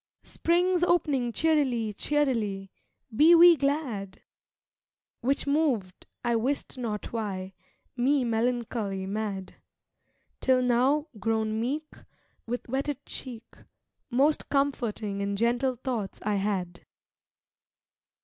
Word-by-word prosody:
'Spring's 355 +1 +1
opening 295 -9 +2
cheerily, 260 -7 +1
cheerily! 215 -8 -1 0.4
be 320 +7 +7
we 340 0 +9
glad!' 270 -10 -2 1.0
Which 275 +3 0
moved, 275 -11 0 0.2
I 235 -1 +2
wist 265 +5 -2
not 230 -5 -4
why, 195 -4 -4 0.4
me 260 +2 +2
melancholy 225 -4 -1
mad, 200 -1 -4 0.8
Till 255 -1 +3
now, 260 +6 +2
grown 220 0 0
meek, 300 +6 -3 0.6
With 245 +2 -4
wetted 275 +2 -3
cheek, 240 -3 -8 0.6
Most 275 +5 +2
comforting 230 -8 -1
and 200 0 -2
gentle 240 +4 +1
thoughts 230 -5 -4
I 210 -1 0
had. 190 -3 -2
240 Hz, 100 wpm, -28 LUFS, 210-280 Hz, 1.0 s, we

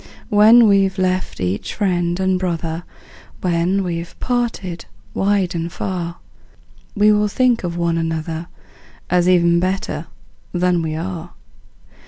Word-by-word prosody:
When 220 +3 +7
we've 195 -1 +3
left 185 0 -1
each 90 +2 -2
friend 175 -3 0
and 190 -1 +1
brother, 170 -2 -3 0.6
When 180 +2 +1
we're 170 -1 -3
parted 230 -8 -2 0.3
wide 195 -2 +1
and 170 0 -3
far, 175 -2 -4 0.8
We 210 0 +5
will 210 0 +3
think 245 +1 +2
of 175 -1 -3
one 170 -1 0
another, 165 0 -3 0.6
As 180 0 +3
even 170 -1 +4
better 185 +2 -2 0.5
than 180 -1 +2
we 155 -1 -3
are. 175 0 -5
180 Hz, 125 wpm, -19 LUFS, 170-195 Hz, 0.8 s, When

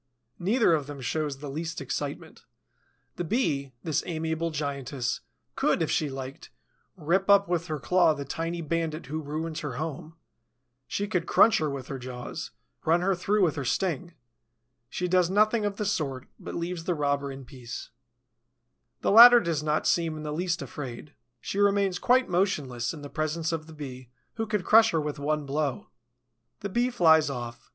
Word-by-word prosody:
Neither 205 +1 +3
of 150 -3 0
them 145 -1 -7
shows 145 +2 -2
the 145 +1 -8
least 165 +3 -4
excitement. - - -5 0.7
The 175 - -2
Bee, 145 - -1
this 160 -2 0
amiable 160 0 -2
giantess, 140 -4 -3 0.4
could, - - +2
if - - -1
she 150 - +1
liked, 135 0 -7 0.5
rip 185 +5 0
up 200 0 +6
with 175 -1 -1
her 155 -2 -2
claw 170 +2 +3
the 140 -1 -5
tiny 165 +4 -3
bandit 165 0 -2
who 155 +4 -4
ruins 155 +2 -4
her 145 -4 -4
home; 155 +3 -5 0.7
she 205 - -2
could 180 -4 -1
crunch 225 - +5
her 155 -1 0
with 140 -2 -5
her 135 - -4
jaws, 125 -1 -6 0.3
run 165 +2 +3
her 195 +2 +2
through 200 +3 +1
with 165 -5 +2
her 140 - -2
sting. 175 +4 -1 0.7
She 180 - -2
does 180 -1 +3
nothing 215 +2 +3
of 205 -1 -1
the 210 - -3
sort, 140 -10 -2
but - - -7
leaves 170 0 -4
the 180 - 0
robber 140 -1 0
in 135 -1 -9
peace. 120 -5 -8 1.1
The - - +1
latter 240 +3 +10
does 165 -8 -1
not 150 0 0
seem 165 -2 +1
in 155 - -7
the 150 -1 -3
least 175 +2 -1
afraid. 140 0 -8 0.3
She 200 - -3
remains 200 -2 +2
quite 255 +1 +3
motionless 150 -10 0
in 150 -3 -9
the - - -6
presence 160 +2 -1
of 160 -1 -4
the 160 - -11
Bee 130 -5 -8 0.2
who 225 -1 -3
could 210 -4 -1
crush 225 +1 +7
her 165 - +1
with 150 -1 -3
one 150 +1 -1
blow. 140 -1 -2 0.7
The 200 - -3
Bee 240 +5 +1
flies 160 - +5
off. 120 -3 -6
160 Hz, 180 wpm, -27 LUFS, 140-180 Hz, 1.1 s, latter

